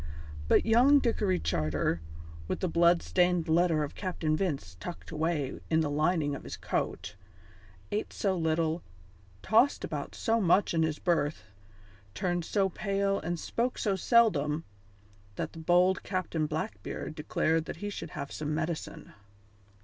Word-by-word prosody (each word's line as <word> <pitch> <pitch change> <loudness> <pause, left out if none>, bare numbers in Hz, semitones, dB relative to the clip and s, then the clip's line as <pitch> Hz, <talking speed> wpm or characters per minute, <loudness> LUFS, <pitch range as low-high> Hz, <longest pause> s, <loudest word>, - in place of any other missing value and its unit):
But - - +4
young 245 +6 +6
Dickory 210 -8 +1
Charter, 80 +1 0 0.5
with - - -3
the 185 - +1
blood 170 +1 +4
stained 180 -2 +2
letter 165 -1 +3
of 145 - -5
Captain 175 -5 -1
Vince 145 - -2
tucked 175 - -8
away 155 -3 -1
in 160 0 +3
the 150 -2 -1
lining 155 0 +1
of 140 - -6
his - - -7
coat, - - -3 0.8
ate 210 - -2
so 195 -2 0
little, 160 0 0 0.6
tossed 240 +6 +3
about - - -4
so 225 -2 +1
much 185 +1 +3
in 165 - +2
his 160 -1 0
berth, 160 -4 0 0.7
turned 175 - -1
so 195 +1 +2
pale 195 +1 -1
and 170 +1 -3
spoke 240 +8 -1
so 200 -3 0
seldom, 170 - +3 0.7
that - - -4
the 165 - -9
bold 180 +3 +3
Captain 175 -5 -2
Blackbeard 155 0 -4
declared 160 +1 0
that - - -5
he 205 0 -4
should - - -6
have 140 - -6
some 150 0 -3
medicine. 160 0 -4
170 Hz, 150 wpm, -30 LUFS, 155-195 Hz, 0.8 s, young